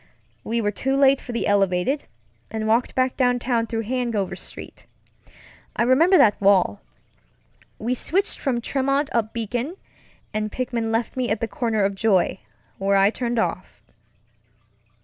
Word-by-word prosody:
We 230 Hz, +1 st, -1 dB
were 205 Hz, -1 st, 0 dB
too 270 Hz, +6 st, -1 dB
late 275 Hz, -1 st, +4 dB
for 245 Hz, -, -8 dB
the 235 Hz, -, -2 dB
elevated, 200 Hz, +7 st, +1 dB, 0.4 s
and 220 Hz, -1 st, -3 dB
walked 230 Hz, +3 st, +1 dB
back 255 Hz, 0 st, +1 dB
downtown 245 Hz, -2 st, +1 dB
through 225 Hz, 0 st, -3 dB
Hanover 235 Hz, -4 st, -2 dB
Street. -, -, -10 dB, 0.9 s
I -, -, +1 dB
remember 320 Hz, +10 st, +5 dB
that 210 Hz, -8 st, +4 dB
walk. 190 Hz, -, +3 dB, 1.0 s
We 235 Hz, +3 st, -1 dB
switched 380 Hz, -, -1 dB
from 250 Hz, -4 st, -1 dB
Tremont 275 Hz, +3 st, 0 dB
up 225 Hz, -2 st, 0 dB
Beacon, 240 Hz, -, -3 dB, 0.6 s
and 215 Hz, 0 st, -2 dB
Pickman 240 Hz, -3 st, -2 dB
left 225 Hz, 0 st, -1 dB
me 255 Hz, -2 st, -1 dB
at 215 Hz, -, 0 dB
the 230 Hz, -, -2 dB
corner 225 Hz, -2 st, -1 dB
of 200 Hz, 0 st, +1 dB
Joy, 195 Hz, -2 st, +1 dB, 0.4 s
where 195 Hz, +1 st, +2 dB
I 195 Hz, +1 st, +4 dB
turned 240 Hz, 0 st, -3 dB
off. 225 Hz, -, -2 dB
235 Hz, 150 wpm, -23 LUFS, 210-255 Hz, 1.0 s, remember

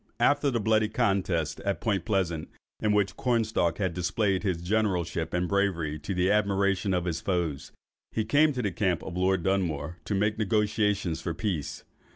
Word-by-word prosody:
After 145 Hz, 0 st, +3 dB
the 120 Hz, -3 st, 0 dB
bloody 110 Hz, 0 st, +2 dB
contest 90 Hz, -8 st, 0 dB
at 100 Hz, -1 st, -2 dB
Point 100 Hz, -6 st, -1 dB
Pleasant, 90 Hz, -6 st, -1 dB, 0.3 s
in 105 Hz, -, +1 dB
which 100 Hz, -2 st, +1 dB
Cornstalk 110 Hz, -9 st, +1 dB
had 95 Hz, -4 st, -1 dB
displayed 95 Hz, +2 st, 0 dB
his 95 Hz, -5 st, 0 dB
generalship 90 Hz, -5 st, 0 dB
and 90 Hz, 0 st, 0 dB
bravery, 85 Hz, -7 st, 0 dB
to 95 Hz, +6 st, -4 dB
the 90 Hz, +2 st, +2 dB
admiration 100 Hz, -2 st, +1 dB
of 90 Hz, 0 st, -1 dB
his 85 Hz, -2 st, -2 dB
foes, 85 Hz, -7 st, -2 dB, 0.4 s
he 110 Hz, -, -1 dB
came 145 Hz, +7 st, +4 dB
in 145 Hz, -, -4 dB
to 125 Hz, -, -1 dB
the 100 Hz, -, 0 dB
camp 90 Hz, -1 st, 0 dB
of 90 Hz, -, -6 dB
Lord 95 Hz, -1 st, +1 dB
Dunmore, 85 Hz, -4 st, -1 dB
to 105 Hz, -, -1 dB
make 105 Hz, +2 st, 0 dB
negotiations 105 Hz, -4 st, +1 dB
for 85 Hz, -3 st, -3 dB
peace. 90 Hz, -9 st, -3 dB
95 Hz, 180 wpm, -28 LUFS, 85-105 Hz, 0.4 s, came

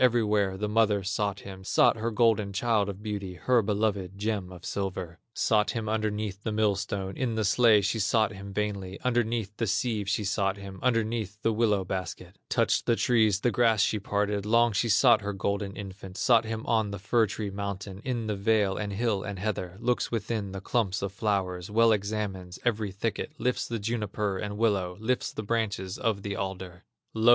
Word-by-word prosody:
Everywhere 105 Hz, -6 st, +3 dB
the 105 Hz, +2 st, -2 dB
mother 105 Hz, -2 st, +2 dB
sought 100 Hz, +1 st, -1 dB
him, 95 Hz, -1 st, -9 dB
Sought 105 Hz, -, +4 dB
her 115 Hz, +1 st, -1 dB
golden 110 Hz, -3 st, +2 dB
child 105 Hz, 0 st, +1 dB
of 100 Hz, +1 st, -7 dB
beauty, 100 Hz, -4 st, -4 dB
Her 125 Hz, +6 st, +3 dB
beloved 100 Hz, -3 st, -1 dB
gem 100 Hz, -3 st, -2 dB
of 90 Hz, -1 st, -11 dB
silver; 95 Hz, -4 st, -4 dB, 0.2 s
Sought 105 Hz, -2 st, +2 dB
him 115 Hz, -3 st, -3 dB
underneath 105 Hz, -2 st, -2 dB
the 110 Hz, -, -3 dB
millstone, 100 Hz, -2 st, 0 dB
In 125 Hz, -3 st, -1 dB
the 110 Hz, -, 0 dB
sledge 105 Hz, 0 st, +5 dB
she 110 Hz, +3 st, 0 dB
sought 110 Hz, +2 st, +2 dB
him 100 Hz, -1 st, -8 dB
vainly, 100 Hz, -2 st, -3 dB
Underneath 115 Hz, -4 st, 0 dB
the 115 Hz, -, 0 dB
sieve 105 Hz, -1 st, 0 dB
she 105 Hz, +2 st, 0 dB
sought 100 Hz, 0 st, 0 dB
him, 100 Hz, -1 st, -9 dB
Underneath 115 Hz, -4 st, 0 dB
the 115 Hz, -, +2 dB
willow 105 Hz, -3 st, +2 dB
basket, 90 Hz, 0 st, -5 dB
Touched -, -, +1 dB
the 115 Hz, -, +4 dB
trees, 110 Hz, -5 st, +3 dB
the 120 Hz, -, +2 dB
grass 115 Hz, -4 st, +3 dB
she 110 Hz, -, +1 dB
parted, 105 Hz, 0 st, -1 dB
Long 115 Hz, +2 st, +3 dB
she 115 Hz, +4 st, +1 dB
sought 120 Hz, -1 st, +5 dB
her 100 Hz, 0 st, -3 dB
golden 100 Hz, 0 st, -2 dB
infant, 95 Hz, -1 st, -8 dB
Sought 115 Hz, -3 st, +4 dB
him 110 Hz, 0 st, -4 dB
on 110 Hz, -2 st, +1 dB
the 100 Hz, -, -4 dB
fir 110 Hz, +4 st, +2 dB
tree 100 Hz, 0 st, -4 dB
mountain, 100 Hz, 0 st, -5 dB
In 120 Hz, -3 st, -2 dB
the 105 Hz, -1 st, -1 dB
vale, 100 Hz, -1 st, +2 dB
and 105 Hz, -1 st, -3 dB
hill, 105 Hz, -1 st, 0 dB
and 100 Hz, 0 st, -5 dB
heather; 95 Hz, -2 st, -3 dB
Looks 120 Hz, +1 st, 0 dB
within 110 Hz, -3 st, -2 dB
the 95 Hz, 0 st, -6 dB
clumps 100 Hz, -3 st, 0 dB
of 100 Hz, -, -2 dB
flowers, 95 Hz, -3 st, -1 dB
Well 115 Hz, +2 st, +4 dB
examines 100 Hz, -3 st, -2 dB
every 110 Hz, -3 st, +1 dB
thicket, 110 Hz, +8 st, -3 dB
Lifts 125 Hz, -2 st, 0 dB
the 115 Hz, -, -2 dB
juniper 105 Hz, -2 st, -2 dB
and 105 Hz, -1 st, -4 dB
willow, 100 Hz, -5 st, +1 dB
Lifts 125 Hz, +3 st, -1 dB
the 110 Hz, -, -5 dB
branches 100 Hz, -4 st, -2 dB
of 105 Hz, -4 st, 0 dB
the 100 Hz, -1 st, -3 dB
alder. 95 Hz, -1 st, -5 dB, 0.3 s
Lo! 110 Hz, +1 st, +3 dB
105 Hz, 190 wpm, -28 LUFS, 95-110 Hz, 0.3 s, sledge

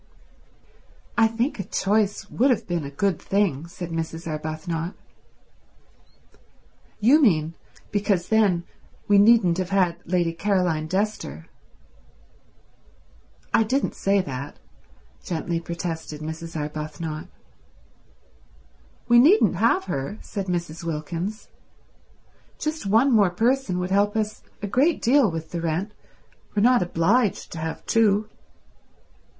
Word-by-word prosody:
"I 225 Hz, -1 st, +5 dB
think 230 Hz, +3 st, -2 dB
a -, -, -1 dB
choice 205 Hz, +2 st, 0 dB
would 260 Hz, +4 st, +3 dB
have 245 Hz, -, +1 dB
been 175 Hz, -3 st, -2 dB
a -, -, -5 dB
good 175 Hz, +4 st, -1 dB
thing," 175 Hz, -7 st, 0 dB
said 175 Hz, 0 st, -7 dB
Mrs. 165 Hz, 0 st, -4 dB
Arbuthnot. 160 Hz, +2 st, -4 dB, 2.0 s
"You 260 Hz, +9 st, +5 dB
mean 165 Hz, -, +3 dB, 0.4 s
because 200 Hz, -3 st, 0 dB
then 205 Hz, -6 st, +3 dB, 0.4 s
we 205 Hz, -1 st, +5 dB
needn't 200 Hz, -5 st, +5 dB
have 185 Hz, -1 st, -2 dB
had 185 Hz, -3 st, +2 dB
Lady 175 Hz, -1 st, 0 dB
Caroline 175 Hz, -3 st, 0 dB
Dester." 185 Hz, -, -2 dB, 2.1 s
"I -, -, +5 dB
didn't 255 Hz, +5 st, 0 dB
say 195 Hz, 0 st, +1 dB
that," 140 Hz, -2 st, -6 dB, 0.7 s
gently 170 Hz, 0 st, -2 dB
protested 165 Hz, -2 st, -5 dB
Mrs. 160 Hz, +1 st, -6 dB
Arbuthnot. 155 Hz, +2 st, -5 dB, 1.8 s
"We 240 Hz, 0 st, +6 dB
needn't 340 Hz, -, +5 dB
have 380 Hz, -, +3 dB
her," 140 Hz, -, -4 dB
said 195 Hz, -2 st, -5 dB
Mrs. 170 Hz, -2 st, -3 dB
Wilkins. 170 Hz, +6 st, -4 dB, 1.1 s
"Just 305 Hz, -7 st, -3 dB
one 225 Hz, +7 st, +4 dB
more 210 Hz, -5 st, +5 dB
person 230 Hz, +1 st, 0 dB
would 180 Hz, +1 st, -3 dB
help 205 Hz, +2 st, +2 dB
us 215 Hz, 0 st, -2 dB, 0.2 s
a -, -, -1 dB
great 280 Hz, -, +2 dB
deal 255 Hz, -1 st, +4 dB
with 165 Hz, -1 st, -6 dB
the 170 Hz, -, -3 dB
rent. 170 Hz, +5 st, -2 dB, 0.6 s
We're 205 Hz, -, +2 dB
not 250 Hz, +1 st, +5 dB
obliged 185 Hz, +6 st, +1 dB
to 165 Hz, -, -6 dB
have 160 Hz, 0 st, -5 dB
two." 215 Hz, -2 st, +3 dB
185 Hz, 120 wpm, -24 LUFS, 165-215 Hz, 2.1 s, We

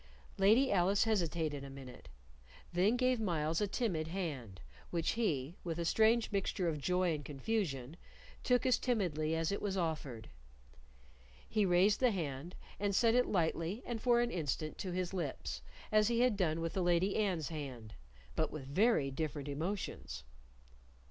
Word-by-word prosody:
Lady 220 Hz, +8 st, +5 dB
Alice 195 Hz, +2 st, +3 dB
hesitated 165 Hz, -9 st, 0 dB
a 140 Hz, -, -7 dB
minute, 135 Hz, -2 st, -11 dB, 0.6 s
then 195 Hz, +7 st, +3 dB
gave 255 Hz, -1 st, +2 dB
Myles 165 Hz, -5 st, 0 dB
a 205 Hz, -, +2 dB
timid 190 Hz, -8 st, -1 dB
hand, 145 Hz, -, -4 dB, 0.3 s
which 170 Hz, -2 st, 0 dB
he, 165 Hz, -, -1 dB
with 165 Hz, -2 st, -3 dB
a 170 Hz, -, -1 dB
strange 225 Hz, +5 st, +3 dB
mixture 195 Hz, -2 st, 0 dB
of 155 Hz, -3 st, -1 dB
joy 180 Hz, +2 st, +2 dB
and 150 Hz, -1 st, -4 dB
confusion, 145 Hz, -, -2 dB, 0.5 s
took 250 Hz, 0 st, +2 dB
as 255 Hz, -, +4 dB
timidly 165 Hz, -, 0 dB
as 165 Hz, +1 st, 0 dB
it 200 Hz, -, -2 dB
was 195 Hz, -2 st, -1 dB
offered. 150 Hz, -10 st, -3 dB, 1.2 s
He 210 Hz, -3 st, +2 dB
raised 185 Hz, +4 st, +4 dB
the 255 Hz, -, +4 dB
hand, 165 Hz, -, -4 dB, 0.2 s
and 200 Hz, -1 st, 0 dB
set 230 Hz, +2 st, +4 dB
it 250 Hz, +1 st, +3 dB
lightly 170 Hz, +3 st, 0 dB
and 235 Hz, -2 st, -4 dB
for 240 Hz, -1 st, +4 dB
an 240 Hz, 0 st, 0 dB
instant 155 Hz, -1 st, -2 dB
to 185 Hz, -, -3 dB
his 180 Hz, +1 st, -2 dB
lips, 135 Hz, -, -3 dB, 0.3 s
as 215 Hz, -1 st, +5 dB
he 235 Hz, 0 st, +2 dB
had 250 Hz, -3 st, +4 dB
done 165 Hz, -4 st, 0 dB
with 165 Hz, 0 st, -2 dB
the 190 Hz, -, 0 dB
Lady 175 Hz, +2 st, +2 dB
Anne's 185 Hz, -8 st, 0 dB
hand, 130 Hz, -9 st, -6 dB, 0.4 s
but 160 Hz, -, +1 dB
with 150 Hz, -4 st, -6 dB
very 150 Hz, -, +2 dB
different 145 Hz, 0 st, -3 dB
emotions. 150 Hz, -, -4 dB
175 Hz, 160 wpm, -35 LUFS, 155-210 Hz, 1.2 s, Lady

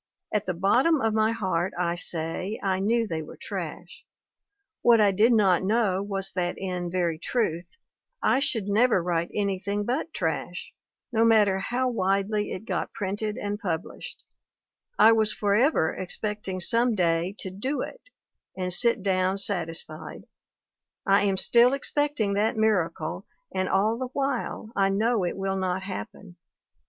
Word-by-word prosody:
At 210 Hz, -1 st, 0 dB
the 185 Hz, -, -1 dB
bottom 255 Hz, -, +3 dB
of 225 Hz, -3 st, +1 dB
my 220 Hz, 0 st, +2 dB
heart, 190 Hz, -4 st, -1 dB
I 175 Hz, -1 st, 0 dB
say, 175 Hz, +4 st, -3 dB
I 190 Hz, -1 st, +1 dB
knew 230 Hz, +4 st, +1 dB
they 165 Hz, -6 st, -3 dB
were 155 Hz, -, -10 dB
trash. -, -, -7 dB, 0.8 s
What 235 Hz, -1 st, +6 dB
I 205 Hz, -2 st, +5 dB
did 215 Hz, +5 st, +4 dB
not 195 Hz, -6 st, +4 dB
know 200 Hz, -2 st, +1 dB
was 195 Hz, -1 st, -3 dB
that, 175 Hz, -1 st, -2 dB
in 180 Hz, -2 st, -3 dB
very 170 Hz, -3 st, -1 dB
truth, 180 Hz, -, -2 dB, 0.4 s
I 260 Hz, -, +2 dB
should 225 Hz, -7 st, -1 dB
never 215 Hz, -2 st, +3 dB
write 170 Hz, -1 st, -1 dB
anything 200 Hz, 0 st, -1 dB
but 270 Hz, +8 st, -2 dB
trash, 175 Hz, -, -3 dB, 0.4 s
no 225 Hz, 0 st, +3 dB
matter 210 Hz, -4 st, +4 dB
how 245 Hz, +6 st, -1 dB
widely 205 Hz, -1 st, 0 dB
it 200 Hz, -, -6 dB
got -, -, -2 dB
printed 205 Hz, +2 st, -3 dB
and 205 Hz, 0 st, -3 dB
published; 175 Hz, -4 st, -5 dB, 0.7 s
I 225 Hz, -, +7 dB
was 220 Hz, -1 st, +3 dB
forever 210 Hz, -, +2 dB
expecting 195 Hz, 0 st, -4 dB
some 230 Hz, +5 st, +2 dB
day 175 Hz, +1 st, +1 dB
to 190 Hz, -, -6 dB
'do 255 Hz, +10 st, -3 dB
it' -, -, -8 dB, 0.5 s
and 180 Hz, -1 st, -2 dB
sit 235 Hz, +1 st, +3 dB
down 190 Hz, 0 st, +1 dB
satisfied; 165 Hz, -5 st, -4 dB, 0.8 s
I 200 Hz, 0 st, +4 dB
am 195 Hz, -1 st, +1 dB
still 240 Hz, +5 st, +5 dB
expecting 285 Hz, -6 st, 0 dB
that 215 Hz, +2 st, +1 dB
miracle 205 Hz, -7 st, 0 dB, 0.3 s
and 185 Hz, 0 st, -1 dB
all 215 Hz, +4 st, +2 dB
the 260 Hz, -, -2 dB
while 270 Hz, -5 st, -2 dB
I 195 Hz, -1 st, +3 dB
know 215 Hz, +2 st, +1 dB
it 175 Hz, -, -3 dB
will 195 Hz, 0 st, -1 dB
not 185 Hz, 0 st, -1 dB
happen. 190 Hz, -1 st, -8 dB
200 Hz, 150 wpm, -26 LUFS, 185-225 Hz, 0.8 s, I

